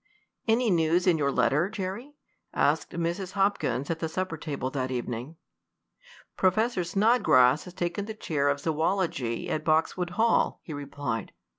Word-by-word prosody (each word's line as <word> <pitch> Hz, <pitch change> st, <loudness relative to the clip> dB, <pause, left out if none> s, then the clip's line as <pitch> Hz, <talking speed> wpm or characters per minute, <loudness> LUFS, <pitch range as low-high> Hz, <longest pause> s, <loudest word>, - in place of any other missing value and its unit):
"Any 225 Hz, 0 st, +3 dB
news 170 Hz, +1 st, +2 dB
in 175 Hz, -4 st, +3 dB
your 140 Hz, -1 st, +1 dB
letter, 150 Hz, +7 st, +2 dB
Jerry?" 215 Hz, +8 st, -5 dB, 0.4 s
asked -, -, +2 dB
Mrs. 170 Hz, +2 st, -3 dB
Hopkins 195 Hz, -8 st, 0 dB
at 165 Hz, -, -3 dB
the 160 Hz, -, -2 dB
supper 185 Hz, 0 st, -3 dB
table 145 Hz, -4 st, -4 dB
that 130 Hz, -2 st, -2 dB
evening. 125 Hz, +3 st, -4 dB, 1.0 s
"Professor 195 Hz, +2 st, +2 dB
Snodgrass 170 Hz, -, +4 dB
has 180 Hz, -1 st, -11 dB
taken 175 Hz, +2 st, -2 dB
the 220 Hz, 0 st, -6 dB
chair 145 Hz, -9 st, 0 dB
of 140 Hz, 0 st, 0 dB
zoology 160 Hz, -6 st, -1 dB
at 155 Hz, -, -2 dB
Boxwood 160 Hz, +3 st, +1 dB
Hall," 230 Hz, +1 st, +2 dB
he 160 Hz, -, -7 dB
replied. 140 Hz, -6 st, -4 dB
170 Hz, 145 wpm, -27 LUFS, 145-190 Hz, 1.0 s, Snodgrass